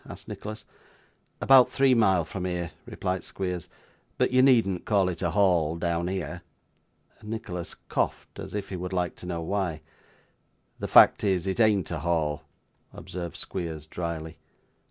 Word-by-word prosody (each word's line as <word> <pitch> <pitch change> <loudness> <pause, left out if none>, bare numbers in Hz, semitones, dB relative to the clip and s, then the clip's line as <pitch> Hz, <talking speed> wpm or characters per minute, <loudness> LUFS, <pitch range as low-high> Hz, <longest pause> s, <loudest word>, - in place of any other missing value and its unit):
asked - - -9
Nicholas. 110 +1 -7 0.8
'About 135 -2 +7
three 135 -1 +3
mile 95 -8 +3
from 90 +3 -5
here,' 90 -2 -3 0.2
replied 90 -2 -3
Squeers. 90 -3 -4 0.5
'But - - +2
you 130 0 +5
needn't 115 -9 +4
call 100 -4 +2
it 90 -2 -5
a 85 - +1
Hall 85 -5 +2
down 85 0 -1
here.' 90 -2 -4 0.8
Nicholas 105 -5 -6
coughed, - - -2
as - - -7
if 100 -1 -4
he 95 - -4
would 90 +1 -5
like 90 -1 -1
to 90 - -9
know 85 -2 -3
why. 90 -3 -2 1.0
'The - - -3
fact - - +7
is, 95 -3 +1
it 95 +3 -2
ain't 105 -6 +3
a 85 - -2
Hall,' 75 -2 -1 0.5
observed 85 -2 -7
Squeers 80 -5 -5
drily. 80 -1 -5
90 Hz, 155 wpm, -27 LUFS, 85-100 Hz, 1.0 s, About